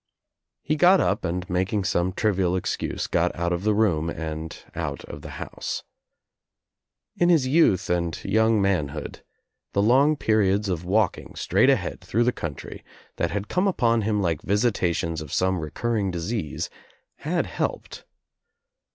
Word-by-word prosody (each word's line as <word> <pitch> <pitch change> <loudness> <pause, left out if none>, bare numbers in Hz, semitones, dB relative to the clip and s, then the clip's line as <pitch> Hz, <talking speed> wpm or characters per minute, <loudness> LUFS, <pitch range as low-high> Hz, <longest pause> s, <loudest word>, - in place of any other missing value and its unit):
He 155 - 0
got 180 +4 +6
up - - +1
and 90 0 -2
making 95 +2 0
some 90 0 +1
trivial 95 -3 +1
excuse 95 - -2
got - - 0
out 85 +1 -1
of 85 +2 -3
the 105 0 +2
room 85 -7 +2
and 80 -1 -5 0.2
out - - -4
of - - -9
the - - -9
house. - - -5 1.3
In 175 - +3
his 160 -7 +4
youth 130 - +3
and 85 -2 0
young 110 +2 +3
manhood 80 -7 -1 0.5
the 100 - +2
long 135 +7 +4
periods 105 -5 +2
of 90 -2 -2
walking 100 +1 0
straight - - +3
ahead - - 0
through 115 +3 +1
the 125 - +3
country, 80 - -7 0.3
that - - 0
had 100 0 -3
come 185 +3 +1
upon 115 -11 +2
him 105 -1 0
like 80 -4 0
visitations 90 -7 0
of 75 -3 -9
some 95 0 +1
recurring 100 +6 -1
disease, 90 -1 -3 0.5
had 170 +4 -1
helped. - - -4
100 Hz, 150 wpm, -25 LUFS, 85-115 Hz, 1.3 s, got